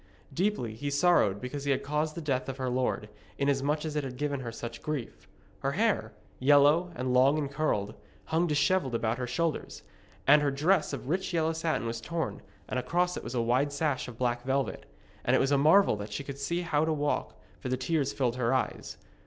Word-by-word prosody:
Deeply 175 - 0
he 145 +6 -4
sorrowed 145 - +3
because 140 +4 -5
he - - -1
had 135 - +1
caused 150 +2 -1
the 170 - -5
death 135 -4 -1
of 135 - -5
her 130 -2 -2
lord, 125 -4 -1 0.3
inasmuch 140 +2 +1
as 155 -1 -4
it 150 - 0
had 130 -2 -6
given 145 0 -1
her 120 -3 -5
such 115 +1 -7
grief. 150 -6 -5 0.3
Her - - -1
hair, - - +1 0.3
yellow 145 +6 +5
and 125 -2 -1
long 135 +4 +5
and 145 -2 -2
curled, 125 -9 -1 0.3
hung 165 +2 +1
dishevelled 150 -3 +2
about 115 +1 -1
her 125 - -2
shoulders, 160 +6 -2 0.4
and 150 +2 +7
her 145 - +2
dress 155 +5 +2
of 140 -2 -6
rich 180 +3 -1
yellow 160 0 +1
satin 160 -5 -1
was 115 0 -3
torn, 165 +6 -3 0.3
and 130 - -1
across 175 +8 0
it - - -6
was 125 - -6
a 120 - +2
wide 130 +5 +2
sash 145 -2 -1
of 120 -3 -9
black 120 -1 0
velvet. 135 +1 -1 0.4
And - - +3
it - - +4
was 135 - +1
a 140 - +4
marvel 160 - +5
that 105 +1 -7
she 120 - -4
could 140 0 -7
see 170 +5 -1
how 155 -4 +1
to 160 - +1
walk, 145 -1 -1 0.2
for 130 - -5
the 130 - 0
tears 140 +1 0
filled 125 -4 -1
her 125 +1 +1
eyes. 130 - -3
140 Hz, 215 wpm, -29 LUFS, 125-155 Hz, 0.4 s, and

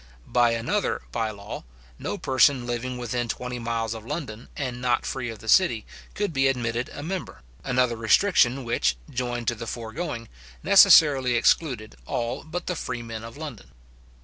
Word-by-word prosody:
By 120 -1 +3
another 115 - -1
bye 110 - -1
law, 100 -1 -8 0.4
no - - -3
person 130 -1 +3
living 120 +1 -3
within 120 0 -2
twenty 125 +1 -4
miles 115 -1 -2
of 110 -1 -8
London, 115 -3 -6
and 125 -3 -3
not 125 0 +1
free 120 -3 -3
of 115 - -6
the 110 - -13
city, 120 - +4 0.3
could 205 -4 -1
be 135 -1 +3
admitted 120 -2 -1
a 145 - -7
member; 185 +3 -5 0.2
another 125 -1 +1
restriction 125 - +3
which, 115 - +1 0.2
joined 120 -1 -3
to - - -1
the 115 0 -7
foregoing, 115 +2 -5 0.4
necessarily 135 -5 +7
excluded 120 - +1
all 120 +2 -2
but 170 +3 -5
the 180 - -2
freemen 115 -6 -5
of 115 +3 -9
London. 145 - -8
120 Hz, 160 wpm, -25 LUFS, 115-135 Hz, 0.4 s, necessarily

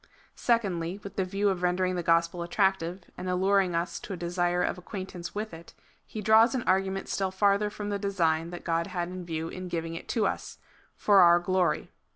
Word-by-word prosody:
Secondly, 195 -6 0
with 200 0 -8
the 190 - +1
view 200 +2 0
of 185 -2 -2
rendering 180 +1 +1
the 175 - -1
gospel 170 +1 +2
attractive, 185 0 0 0.2
and 185 - -4
alluring 190 0 +2
us 170 +1 -2
to 200 - -7
a - - -5
desire 175 +1 0
of - - -1
acquaintance 185 -1 -7
with 215 -1 -4
it, 165 +1 -12 0.3
he 215 - -6
draws 220 +4 +5
an 250 - -1
argument 190 +1 0
still 195 -1 -1
farther 200 +2 +2
from 210 0 -6
the 200 -1 -2
design 170 -5 0
that 175 0 -8
God 165 0 0
had 175 -2 -3
in 185 0 -6
view 160 -1 -3
in 185 +1 -6
giving 165 -1 -3
it 165 - -7
to 225 -4 +1
us - - -3 0.2
— - - -30
^' - - -36
for 205 -2 +5
our 175 -1 +7
glory." 180 -2 0
185 Hz, 210 wpm, -28 LUFS, 175-200 Hz, 0.3 s, our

